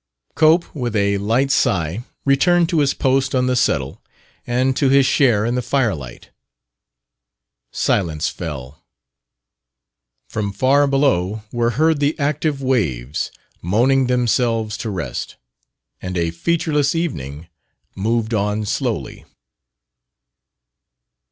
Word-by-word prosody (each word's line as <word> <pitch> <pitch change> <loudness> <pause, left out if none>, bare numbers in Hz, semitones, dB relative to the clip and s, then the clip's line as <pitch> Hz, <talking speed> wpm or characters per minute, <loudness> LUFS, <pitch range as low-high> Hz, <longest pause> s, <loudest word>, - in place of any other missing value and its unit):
Cope, 160 +2 +3
with 120 -6 -3
a 100 -1 +1
light 120 +7 +1
sigh, 90 - 0 0.2
returned 170 +5 +3
to 170 -4 +1
his 140 -2 +3
post 135 0 +1
on 125 0 +2
the 130 0 +1
settle 70 - 0 0.5
and 130 +2 +1
to 135 -1 +2
his 135 0 +5
share 120 -6 +3
in 120 - 0
the 125 - 0
firelight. 105 - -2 1.4
Silence 80 -4 0
fell. 75 -5 -7 1.4
From 105 -2 -3
far 135 +6 +3
below 110 -8 +1
were 120 -1 +1
heard 160 0 +3
the 145 +2 0
active 145 -1 -1
waves, 75 - -1 0.3
moaning 125 +8 +2
themselves 120 -3 +1
to 115 - -4
rest. 85 - -5 0.7
And 90 0 -4
a 85 -1 0
featureless 150 - 0
evening 80 - -4 0.5
moved 115 +3 -1
on 105 0 0
slowly. - - -3
120 Hz, 115 wpm, -20 LUFS, 100-140 Hz, 1.4 s, his